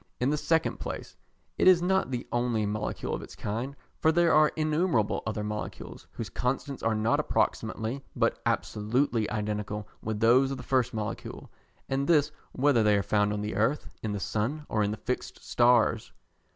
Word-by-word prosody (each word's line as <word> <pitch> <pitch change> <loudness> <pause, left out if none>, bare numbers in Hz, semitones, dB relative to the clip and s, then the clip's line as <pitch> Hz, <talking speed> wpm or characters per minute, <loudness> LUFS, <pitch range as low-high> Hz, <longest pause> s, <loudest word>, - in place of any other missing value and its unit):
In 125 +3 +2
the - - +2
second 160 +2 0
place - - -6 0.4
it - - +4
is 185 -2 +8
not 190 0 +1
the 125 -2 -4
only 120 -3 +1
molecule 105 +1 -3
of - - -3
its - - -10
kind, 120 +7 -4 0.2
for 160 - +4
there 170 0 +3
are 155 0 +5
innumerable 155 - +1
other 105 -1 -2
molecules, 105 0 -6
whose 115 - -5
constants 130 +4 -2
are 115 -1 +1
not 110 +1 +2
approximately, 120 +5 -1
but - - +1
absolutely 115 +1 0
identical 105 -1 -3
with 110 -1 -3
those 125 +4 +5
of 135 - -3
the 125 - -8
first 125 -1 +1
molecule, 110 -2 -5 0.4
and 135 +1 -1
this 150 -3 +4 0.2
whether 135 -3 +3
they 105 -1 +4
are 100 - 0
found 105 +2 +2
on 105 0 -2
the 105 +1 -3
earth, 115 +8 0
in 110 - -2
the 105 - -2
sun, 120 +10 -2
or 110 - +1
in 105 - +1
the 105 - -3
fixed 125 +4 -5
stars. 120 -2 +3
120 Hz, 180 wpm, -28 LUFS, 105-140 Hz, 0.4 s, is